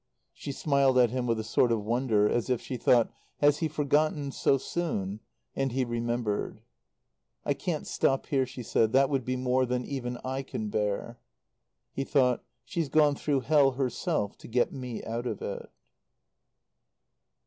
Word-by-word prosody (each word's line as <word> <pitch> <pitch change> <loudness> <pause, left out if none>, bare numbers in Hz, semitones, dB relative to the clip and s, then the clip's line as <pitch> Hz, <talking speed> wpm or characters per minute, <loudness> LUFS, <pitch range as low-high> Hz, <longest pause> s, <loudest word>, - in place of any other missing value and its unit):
She - - -6
smiled 140 -2 +2
at 120 -3 +5
him 125 -1 -2
with 115 -1 +1
a - - -2
sort 115 +2 +2
of 110 -3 0
wonder, 115 -2 +2
as 120 +3 0
if 125 -2 +1
she 130 - -6
thought: 120 -1 +3 0.3
"Has 145 0 +3
he 160 - +1
forgotten, 150 -1 +1
so 135 - +2
soon?" 110 - -3 0.4
And 135 -1 0
he 130 0 +1
remembered. 120 -2 -2 0.8
"I - - +2
can't - - -3
stop 135 - +1
here," 135 -2 +1
she 130 -1 -8
said. 110 0 +1
"That 135 +2 +4
would 135 -2 +1
be 130 +2 -2
more 130 0 +1
than 125 0 -1
even 125 -3 -4
I 130 +1 -2
can 110 -5 -5
bear." 105 +3 -2 0.7
He 135 - -2
thought: 130 -3 +2 0.2
"She's 160 +3 -2
gone 150 -1 +4
through 140 -1 0
hell 140 0 +4
herself, 130 - -1
to - - -11
get 120 +1 +1
me 125 -4 -6
out 115 +2 -3
of - - -3
it." - - -5
130 Hz, 170 wpm, -29 LUFS, 120-140 Hz, 0.8 s, at